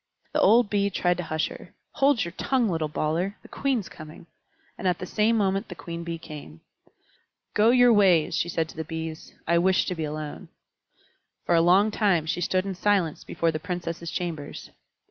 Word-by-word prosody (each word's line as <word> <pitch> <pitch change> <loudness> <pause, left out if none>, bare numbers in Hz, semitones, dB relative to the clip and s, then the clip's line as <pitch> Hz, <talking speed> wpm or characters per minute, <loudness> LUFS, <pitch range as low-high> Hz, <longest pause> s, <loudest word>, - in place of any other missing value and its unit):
The - - +2
old 235 +1 +5
Bee 200 -1 +1
tried 180 -2 +1
to 180 - -3
hush 155 -1 -1
her. - - -12 0.2
"Hold 275 -7 +2
your 170 - -5
tongue, 250 +6 0
little 160 -3 -1
bawler! 165 +6 -1
The - - -13
Queen's 260 -8 -1
coming." 155 +1 -12 0.5
And - - -3
at 180 -1 +2
the 180 - -6
same 220 +4 +2
moment 195 0 0
the 180 - -7
Queen 170 0 -7
Bee 170 0 -4
came. 145 - -10 0.9
"Go 215 +2 +4
your 245 -1 +6
ways," 180 -7 +4
she 165 +2 0
said 165 -1 -1
to - - -12
the 160 - -4
Bees; 160 0 -7
"I 170 0 +4
wish 185 +2 +3
to - - -2
be 165 -2 -4
alone." 150 0 -6 1.0
For - - +2
a 165 - +5
long 190 +5 +4
time 195 -7 +2
she 175 +2 -2
stood 185 +1 +1
in 195 - -3
silence 185 -4 0
before 165 -1 0
the 155 - -4
Princesses' 170 0 -4
chambers. 165 -5 -5
175 Hz, 195 wpm, -26 LUFS, 160-200 Hz, 1.0 s, your